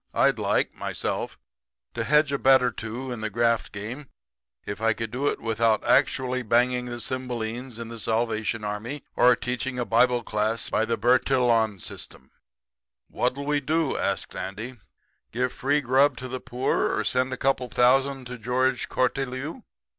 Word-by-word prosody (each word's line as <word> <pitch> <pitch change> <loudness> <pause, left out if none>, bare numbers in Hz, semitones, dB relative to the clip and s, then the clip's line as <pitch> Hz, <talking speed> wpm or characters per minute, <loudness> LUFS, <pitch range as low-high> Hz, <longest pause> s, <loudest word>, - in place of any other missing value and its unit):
I'd - - +3
like, - - +1
myself, - - -3 0.6
to - - -2
hedge 150 0 +3
a 140 - -1
bet 130 -1 +6
or 125 - +2
two 115 +5 -6
in 120 -3 -5
the 110 - -2
graft 115 +1 +1
game 115 +8 -6 0.6
if 100 +2 -5
I 115 0 +3
could 115 0 -5
do 135 +4 -1
it - - 0
without 115 -1 +1
actually 130 -2 +2
banging 125 +2 +2
the 120 -1 -5
cymbalines 120 0 -4
in 115 -1 -7
the 115 -1 -7
Salvation 110 -1 -1
Army 110 +7 -4
or 125 0 +6
teaching 125 +1 -3
a 125 - -1
bible 120 +1 +3
class 110 +1 -1
by 110 - +2
the 115 0 -1
Bertillon 120 -3 +2
system. 65 -5 -9 0.8
"'What'll 130 +3 -1
we 145 0 +1
do?' 155 +1 0
says 100 - -1
Andy. 105 +7 -6 0.5
'Give 125 +2 -1
free 145 +3 +1
grub 135 +2 +3
to 130 - -6
the 130 +1 -4
poor 125 +1 0
or - - 0
send 130 +1 +1
a 130 - -3
couple 135 -1 +1
of - - -15
thousand 135 +2 +3
to 125 0 -7
George 125 +3 0
Cortelyou?' 135 - -2
125 Hz, 170 wpm, -26 LUFS, 115-130 Hz, 0.8 s, bet